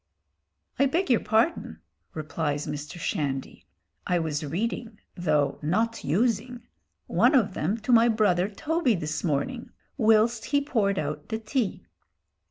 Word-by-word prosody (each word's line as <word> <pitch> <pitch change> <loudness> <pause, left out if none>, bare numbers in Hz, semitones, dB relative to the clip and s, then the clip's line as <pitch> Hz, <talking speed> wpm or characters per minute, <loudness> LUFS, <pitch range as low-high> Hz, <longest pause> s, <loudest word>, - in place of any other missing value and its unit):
"I 275 - +5
beg 335 +2 0
your 235 - +5
pardon," 220 - 0 0.4
replies 150 -1 -2
Mr. 150 +3 -6
Shandy, 140 -5 -3 0.4
"I 180 - +2
was 155 -2 -2
reading 215 - -3 0.2
though 155 -5 +1
not 220 +9 0
using 235 - 0 0.4
one - - +3
of 210 -7 +3
them 190 +8 -1
to 220 - -1
my 235 0 +6
brother 205 -4 +2
Toby 300 +2 0
this 155 -3 -3
morning, 175 - -2 0.3
whilst 225 0 +3
he 285 - +2
poured 220 -9 0
out 150 0 -4
the 220 - -1
tea." 225 0 -2
210 Hz, 135 wpm, -26 LUFS, 155-235 Hz, 0.4 s, my